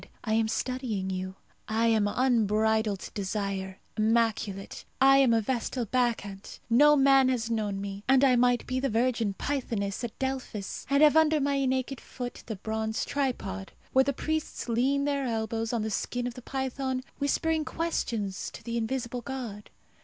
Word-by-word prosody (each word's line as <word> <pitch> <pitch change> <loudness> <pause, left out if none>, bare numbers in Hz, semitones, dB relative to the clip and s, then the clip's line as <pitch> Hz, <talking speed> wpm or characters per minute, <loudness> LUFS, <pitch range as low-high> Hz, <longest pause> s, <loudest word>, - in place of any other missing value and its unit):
"I 220 - -1
am 225 0 +3
studying 220 -5 -2
you. 185 0 -4 0.3
I 220 +1 +1
am 215 -2 +3
unbridled 220 -3 +1
desire, 195 -1 -3 0.2
immaculate. 220 -3 0 0.2
I 270 0 +7
am 270 -3 +5
a 225 -1 +3
vestal 245 +1 -2
bacchante. 220 -5 -2
No 295 +5 +7
man 270 -1 +5
has 235 -3 -1
known 210 -3 -1
me, 200 0 -6
and 265 +1 +5
I 260 -2 +6
might 245 0 +3
be 255 0 -1
the 270 +1 0
virgin 230 -3 +1
pythoness 230 -8 -2
at 235 - -5
Delphos, 260 -7 -4
and 280 +2 +4
have 300 0 +6
under 315 -1 +5
my 280 -1 +1
naked 260 0 -1
foot 245 -1 -7
the 220 - -3
bronze 220 +2 -2
tripod, 255 - -3 0.2
where 265 - +6
the 280 - 0
priests 315 +2 -3
lean 265 +4 +1
their 280 -2 0
elbows 225 0 -2
on 235 -3 0
the 220 - -2
skin 245 +4 -2
of 245 - -3
the 250 - -10
python, 265 0 -3 0.2
whispering 315 +3 +1
questions 230 - -2
to - - -11
the 235 +1 -3
invisible 240 +1 -2
god. 240 -6 -6
235 Hz, 165 wpm, -28 LUFS, 215-265 Hz, 0.3 s, I